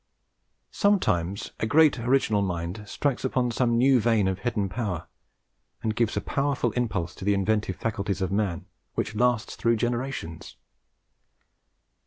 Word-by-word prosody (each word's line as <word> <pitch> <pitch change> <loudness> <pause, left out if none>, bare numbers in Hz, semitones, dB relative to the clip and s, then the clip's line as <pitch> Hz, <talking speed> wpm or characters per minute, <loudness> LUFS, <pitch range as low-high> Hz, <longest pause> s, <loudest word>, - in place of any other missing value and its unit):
Sometimes 100 - +1
a 110 - 0
great 150 +1 +5
original 115 -4 +2
mind 90 +2 -3
strikes 140 +4 -1
upon 125 -2 0
some 120 0 +1
new 130 +1 +5
vein 110 -3 +2
of 95 0 -1
hidden 105 -3 -1
power, 95 -5 -3 0.8
and 110 -1 -1
gives 115 -1 +1
a - - +1
powerful 140 -4 0
impulse 100 -8 -2
to - - -10
the 100 +1 +2
inventive 105 -1 0
faculties 100 -2 -2
of 95 -1 -1
man, 100 -4 -1 0.3
which 110 - -2
lasts 120 0 +1
through 115 0 +2
generations. 120 -7 -3
110 Hz, 140 wpm, -26 LUFS, 95-125 Hz, 0.8 s, great